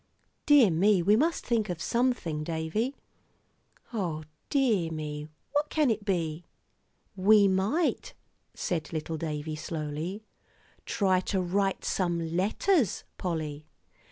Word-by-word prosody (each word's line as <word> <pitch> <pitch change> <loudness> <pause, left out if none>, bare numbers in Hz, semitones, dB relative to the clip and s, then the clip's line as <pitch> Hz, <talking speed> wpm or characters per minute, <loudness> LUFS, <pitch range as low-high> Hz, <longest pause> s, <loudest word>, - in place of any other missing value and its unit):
"Dear 280 - +7
me, 185 +2 +3
we 205 +4 +5
must 320 +8 +1
think 225 -4 +1
of 175 -2 -3
something, 235 -9 0
Davie. 165 - -2 1.0
O 170 -8 -2 0.3
dear 230 - +2
me, 150 -1 -5 0.2
what 295 +1 0
can 300 -6 +2
it 215 -1 -2
be?" 170 -4 -1 0.7
"We 200 +1 +6
might," 200 - 0 0.4
said 160 -4 -2
little 160 0 -3
David, 155 -1 -4
slowly, 155 +5 -4 0.6
"try 190 -3 +2
to 190 +1 -1
write 195 +2 0
some 170 -3 -1
letters, 220 - +1 0.2
Polly. 155 -4 -3
185 Hz, 115 wpm, -28 LUFS, 160-220 Hz, 1.0 s, Dear